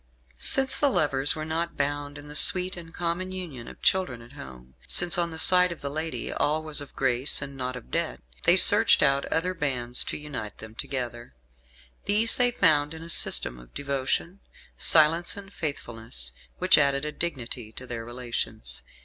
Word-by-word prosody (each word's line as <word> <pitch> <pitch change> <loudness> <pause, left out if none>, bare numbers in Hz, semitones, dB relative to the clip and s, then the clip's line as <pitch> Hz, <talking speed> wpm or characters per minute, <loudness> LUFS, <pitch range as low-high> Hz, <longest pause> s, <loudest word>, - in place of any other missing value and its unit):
Since 265 0 +3
the 285 - +3
lovers 140 - +1
were 155 0 -5
not 165 +2 -3
bound 145 0 -3
in 145 0 -12
the 150 - -9
sweet 180 +4 +6
and 170 -2 -11
common 175 +2 -3
union 165 -11 -8
of - - -13
children 185 -11 +1
and 120 +3 -15
home, 65 - -12
since 175 +1 +3
on 170 -1 0
the 160 - -9
side 180 +2 +5
of 170 - -8
the 140 - -5
lady 160 +2 -4
all 155 +1 +1
was 155 -1 0
of 145 - -11
grace 130 +1 +3
and 140 0 -7
nought 130 -1 -5
of 125 - -11
debt, 170 -1 -3 0.3
they 170 - +6
searched 205 +1 +6
out 140 -1 +2
other 180 +3 -2
bands 125 -7 -1
to - - -4
unite 145 -9 -7
them 110 0 -11
together. 120 - -6 0.7
These 215 +3 +4
they 245 -1 +3
found 150 -9 +2
in 160 - -10
a 165 - -10
system 60 - +1
of - - -18
devotion, 140 +6 -3 0.4
silence 165 +3 +2
and 200 0 -11
faithfulness, 115 - -6 0.2
which 185 -3 +5
added 140 0 +1
a 150 - -4
dignity 125 -8 -5
to 130 - -6
their 120 -2 -6
relations. 115 - -5
145 Hz, 185 wpm, -26 LUFS, 125-170 Hz, 0.7 s, sweet